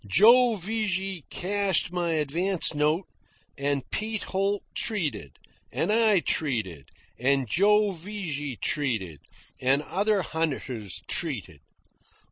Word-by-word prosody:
Joe 235 - +6
Vigy 195 -4 -2
cashed 195 -2 0
my 175 -2 -1
advance 160 +5 +1
note, 155 +5 +1 0.5
and 140 -1 -2
Pete 215 0 -2
Holt 195 +1 -1
treated, 155 - -1 0.3
and - - 0
I 215 -4 +4
treated, 110 - -2 0.3
and 135 +1 +2
Joe 205 - +3
Vigy 165 -7 -5
treated, 110 - -2 0.4
and 135 +3 +2
other 200 +3 0
hunters 130 - -3
treated. 115 - -1
170 Hz, 100 wpm, -26 LUFS, 140-200 Hz, 0.5 s, Joe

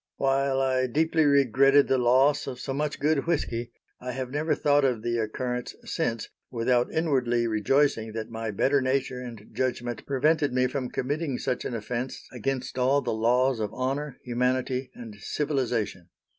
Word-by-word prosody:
While 135 0 +1
I 130 -1 +1
deeply 160 +4 +2
regretted 140 0 +5
the 130 - +2
loss 130 +4 +3
of 125 -2 -5
so 135 - -4
much 150 +2 -2
good 150 +1 +1
whisky, 120 -8 -1 0.3
I 125 0 -5
have 130 -1 -4
never 150 +3 0
thought 145 0 +3
of 125 -5 +1
the 120 0 0
occurrence 125 +2 -3
since 115 -2 -2 0.2
without 120 0 +1
inwardly 130 -7 +1
rejoicing 115 +1 +1
that 110 0 -5
my 115 0 -4
better 135 +7 +2
nature 130 -1 -1
and 115 -4 -9
judgment 120 -2 -2
prevented 145 +1 +2
me 125 0 +3
from 130 0 -2
committing 145 0 -2
such 125 - -2
an 120 - -3
offense 120 +3 -4
against 130 +1 -3
all 135 +3 +3
the 120 - -1
laws 125 +3 +2
of 105 -2 -2
honor, 135 +2 -2
humanity 125 +1 -1
and 115 -4 -10
civilization. 120 - -2
130 Hz, 160 wpm, -27 LUFS, 120-140 Hz, 0.3 s, regretted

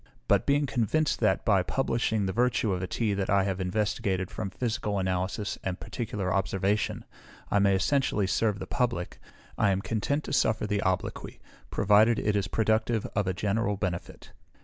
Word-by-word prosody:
But - - +3
being 145 +1 +3
convinced, 140 +5 0
that, 110 - +1
by 100 -4 +4
publishing 110 -1 0
the 95 - -2
virtue 120 -4 +1
of 90 - -2
a 90 - -3
tea 110 0 -1
that 100 -1 -2
I 100 0 +4
have 95 -1 -2
investigated 95 -1 -1
from 100 - -4
physical 105 -1 -2
analysis 95 +2 -2
and 95 -1 -3
particular 105 -5 -3
observation, 95 +1 0 0.5
I 100 - +4
may 100 -1 +4
essentially 110 0 +1
serve 105 +1 +1
the - - -6
public, 120 -9 -2 0.4
I 105 - +4
am 95 -1 +1
content 140 +7 -1
to - - -5
suffer 110 0 +2
the 105 -1 0
obloquy, 95 0 -2 0.3
provided 105 +3 +4
it 105 0 0
is 100 -1 0
productive 110 +1 +1
of 100 -1 +1
a 95 - +1
general 105 +1 0
benefit. 90 -2 -5
105 Hz, 170 wpm, -28 LUFS, 95-110 Hz, 0.5 s, by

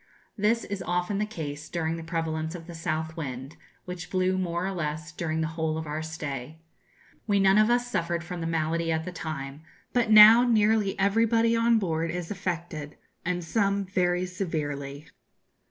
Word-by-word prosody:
This 220 +3 +1
is 200 -2 -5
often 180 +3 -1
the 210 - 0
case 155 -7 -6
during 165 -1 -1
the 165 - -6
prevalence 160 -1 -2
of 165 -2 -8
the 175 - -9
south 160 -1 -3
wind, 135 -2 -6 0.3
which 180 -1 -7
blew, 185 0 +1
more 175 -1 -1
or 195 - -1
less, 155 -3 -4
during 160 -1 -2
the 160 - -1
whole 160 -1 -1
of 160 - -4
our 150 +1 -3
stay. 155 -3 -5 0.7
We 200 -2 +3
none 195 +1 +5
of 215 +1 +4
us 240 0 +2
suffered 170 -8 -2
from 175 0 -6
the 165 - -2
malady 165 +1 0
at 160 0 -1
the 180 - -5
time, 145 -4 -6 0.3
but 240 -3 +2
now 215 +2 +10
nearly 215 -3 +2
everybody 225 +3 +3
on 230 0 +4
board 165 -5 -1
is 175 +1 -4
affected, 170 -6 -4 0.3
and 175 0 -2
some 200 +3 0
very 180 -1 +1
severely. 150 -6 -4
170 Hz, 175 wpm, -27 LUFS, 160-195 Hz, 0.7 s, now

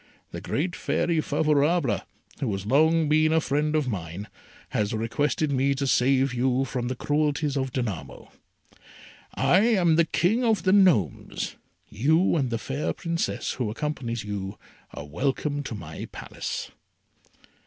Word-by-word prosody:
The - - -6
great 175 +5 -2
Fairy 165 -2 0
Favourable, 150 - +2 0.4
who 125 -6 -1
has 95 0 -4
long 155 +6 +3
been 155 +1 +3
a 160 - +4
friend 150 +1 0
of 150 -3 +1
mine, 90 -2 -5 0.4
has 105 +1 -1
requested 145 +7 0
me 140 +1 +2
to 140 +1 -2
save 135 0 +3
you 130 +2 +1
from 125 -1 -3
the 130 - -2
cruelties 150 +1 0
of 135 -1 -1
Danamo. 95 - -5 1.0
I 135 +7 +4
am 190 -7 +3
the 170 - +5
King 205 +10 +1
of 225 -3 +2
the 185 - +3
Gnomes. 170 - +2 0.3
You 160 - +2
and 135 -6 +1
the 115 - -1
fair 135 +6 -3
Princess 170 -1 -2
who 125 -5 -2
accompanies 120 -2 -3
you 100 -1 -5 0.3
are 70 - -8
welcome 140 - -1
to 135 -5 -6
my 80 -6 -7
Palace." - - -5
140 Hz, 145 wpm, -26 LUFS, 115-155 Hz, 1.0 s, the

